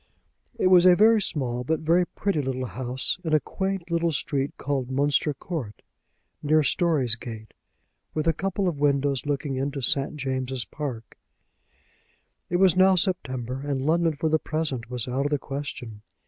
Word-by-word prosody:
It - - 0
was 185 -1 +7
a 180 - +8
very 220 +2 +5
small 125 -9 -2
but 160 +5 -1
a - - -11
very 175 +3 +3
pretty 195 -7 -1
little 130 -1 -3
house, 125 - -2
in 160 -2 +1
a - - +5
quaint 190 0 -4
little 170 0 +1
street 140 -1 -1
called 135 -2 -2
Munster 145 +3 +1
Court, 135 - -6 0.6
near 155 +1 +3
Storey's 140 -4 +2
Gate, 110 -1 -9 0.6
with 155 +1 -1
a 165 - +4
couple 195 +3 -1
of 160 -5 -2
windows 140 -1 +1
looking 140 -1 -2
into 140 +1 -2
St. 135 +3 +1
James's 130 -3 -3
Park. 125 -2 -7 1.3
It 175 - -1
was 185 -2 +5
now 190 +1 +5
September, 130 - -2
and 140 -2 -2
London 160 +3 +1
for 160 - -1
the 155 0 +2
present 150 -8 -3
was 125 -2 -2
out 135 +3 0
of - - -6
the 145 - +2
question. 135 -6 -6
145 Hz, 170 wpm, -25 LUFS, 130-165 Hz, 1.3 s, a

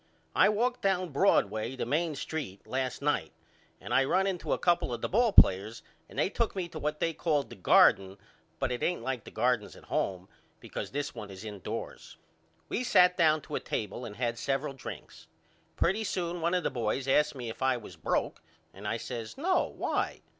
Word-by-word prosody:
I - - +6
walked 245 +4 0
down 185 -2 +1
Broadway 115 - +2
the 130 - -3
Main 155 +5 0
Street 140 -9 -5
last 130 +1 -3
night 145 - 0 0.5
and - - -5
I 135 - +5
run 190 +8 +2
into 190 -3 -2
a - - +3
couple 175 -7 +2
of 120 -1 -4
the - - 0
ball 235 +3 +3
players 105 - +5 0.3
and - - -13
they - - +3
took 230 +2 -1
me 185 -3 -2
to 160 - -7
what 150 +1 -2
they 165 - 0
call 150 -3 +1
the 120 - -13
Garden 95 0 +4 0.4
but - - 0
it 125 - -3
ain't 175 - 0
like 130 -4 -3
the - - -8
gardens - - 0
at - - -15
home 95 -1 -1 0.3
because - - -6
this 145 +1 -3
one 110 -4 -8
is 95 +2 -9
indoors. 105 -4 -6 0.5
We 250 - -2
sat 180 -6 +5
down 155 -3 +4
to - - -11
a - - 0
table 105 +3 -4
and 105 -4 -7
had 120 -1 -2
several 135 +1 -1
drinks. 80 -10 -9 0.5
Pretty 195 +6 +1
soon 175 -3 -2
one 170 +2 +1
of 180 - 0
the - - 0
boys 125 +1 -1
asked 150 +2 +3
me 120 -3 -5
if - - -12
I 130 -1 +2
was 105 -7 -10
broke 80 - -1 0.3
and 100 +2 -8
I 110 - 0
says 115 - -6
No, 360 +7 +2
why? - - -2
135 Hz, 205 wpm, -30 LUFS, 115-175 Hz, 0.5 s, I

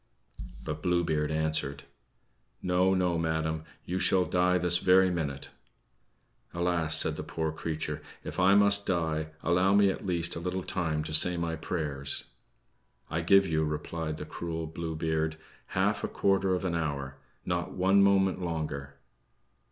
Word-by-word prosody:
But 75 0 -4
Blue 90 0 +1
Beard 75 -3 0
answered: 80 -2 -1 0.8
"No, 90 +1 +2
no, 90 -2 +1
madam; 80 -1 -1 0.2
you 90 +2 -2
shall 95 -1 +3
die 90 0 +2
this 90 0 +3
very 95 0 +4
minute." 70 -5 -4 1.0
"Alas," 85 -2 +1
said 80 -1 +2
the 75 - -4
poor 80 0 -3
creature, 80 -1 -4 0.2
"if - - -6
I 95 +2 +5
must 100 0 +4
die, 80 -4 0 0.2
allow 90 +3 +3
me, 100 -1 +5
at - - -7
least, 85 -3 -1
a - - -4
little 90 +2 -3
time 80 -5 -2
to 75 - -6
say 90 +3 +6
my 85 -1 -2
prayers!" 75 -4 -2 0.8
"I 85 - -1
give 95 +3 +5
you," 80 -3 0
replied 75 +1 -3
the - - -6
cruel 80 -1 -5
Blue 80 0 -5
Beard, 80 0 -1 0.3
"half - - 0
a - - 0
quarter 95 -1 +1
of 90 - -4
an 90 - -1
hour 70 -4 -3 0.3
not 90 -1 -2
one 95 +2 +3
moment 95 -1 +3
longer." 75 -5 -4
85 Hz, 155 wpm, -29 LUFS, 80-90 Hz, 1.0 s, say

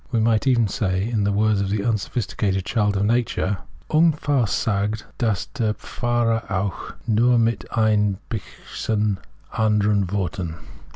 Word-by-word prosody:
We 115 - +2
might 110 +3 +2
even 120 -4 +4
say, 95 0 -1
in 110 -4 0
the 100 - +2
words 105 0 +2
of 100 - -1
the 100 0 -1
unsbphisticated 105 -3 -1
child 105 -3 +1
of 100 - +1
nature, 110 -4 0 0.3
Ungefahr 145 -6 +3
sagt 105 +1 -1
das 110 -5 0
der 110 -4 0
Pfarrer 120 -2 0
auch, 95 -1 -3
Nur 120 +2 +3
mit 115 0 0
ein 105 -3 +3
bischen 105 -1 -3 0.3
anderen 105 -3 +2
Worten. 90 -4 -2
105 Hz, 135 wpm, -23 LUFS, 100-115 Hz, 0.3 s, even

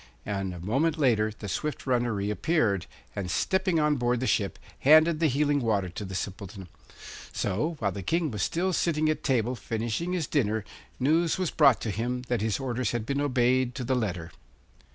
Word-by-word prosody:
And 95 -2 -2
a 90 - -7
moment 135 - 0
later 110 -7 +2
the 105 - -7
swift 150 +9 -3
runner 120 -2 +1
reappeared, 105 - 0 0.3
and, 95 -3 -3
stepping 185 - +1
on 150 -1 +2
board 120 -1 +1
the 130 - -1
ship, 100 -5 0 0.2
handed 155 +3 +6
the 165 - +3
healing 145 +1 +2
water 105 -7 0
to 95 +4 -6
the 95 -1 -6
Simpleton. 95 -1 -6 0.6
So 115 - -1
while 100 -7 0
the 100 - -6
King 160 - 0
was 105 -4 -4
still 180 - 0
sitting 155 -2 +1
at 155 - -1
table 125 -2 +1
finishing 115 +10 -3
his 175 -4 0
dinner 110 -8 0 0.3
news 160 +5 +2
was 185 -3 -1
brought 140 -8 +5
to 110 - -2
him 120 +5 -2
that 120 -4 0
his 110 +2 0
orders 130 -2 -2
had 120 -2 -2
been 140 +2 -1
obeyed 130 -2 +2
to 130 - -4
the 130 +2 0
letter. 90 -9 -2
125 Hz, 190 wpm, -27 LUFS, 105-150 Hz, 0.6 s, handed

